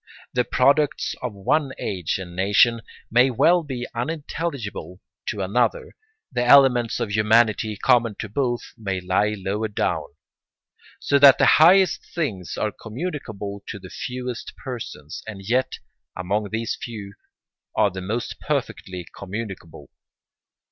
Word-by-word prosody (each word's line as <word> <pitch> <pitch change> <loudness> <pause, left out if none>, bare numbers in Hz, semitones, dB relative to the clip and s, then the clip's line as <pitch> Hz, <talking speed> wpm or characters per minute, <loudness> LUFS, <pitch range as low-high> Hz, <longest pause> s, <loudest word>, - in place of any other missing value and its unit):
The 125 - +2
products 140 +4 +2
of 125 - -3
one 130 +8 0
age 90 -5 -2
and 90 -2 -8
nation 105 +5 +4 0.3
may 125 +3 +5
well 170 +8 +4
be 130 -6 -5
unintelligible 135 - -4 0.3
to 105 - -2
another; 115 +4 0 0.4
the 125 -1 0
elements 125 -3 +5
of 115 -4 -2
humanity 110 0 +3
common 115 -1 +3
to 110 - -5
both 120 +2 -1
may 100 -5 -3
lie 95 +4 +1
lower 100 +3 -2
down. 105 - -1 0.9
So 140 - +2
that 140 -1 +9
the - - +4 0.2
highest 185 +3 +6
things 105 - -3
are 105 - 0
communicable 110 - -6
to - - -5
the 95 -2 -12
fewest 125 -1 -5
persons, 120 - -7
and 100 -3 -7
yet, 125 +3 +1 0.4
among 100 +3 -2
these 110 +2 -2
few, 105 -4 -7 0.6
are 105 -2 +3
the 95 0 -6
most 110 +6 -3
perfectly 90 -2 -3
communicable. 95 - -7
110 Hz, 130 wpm, -23 LUFS, 100-125 Hz, 0.9 s, that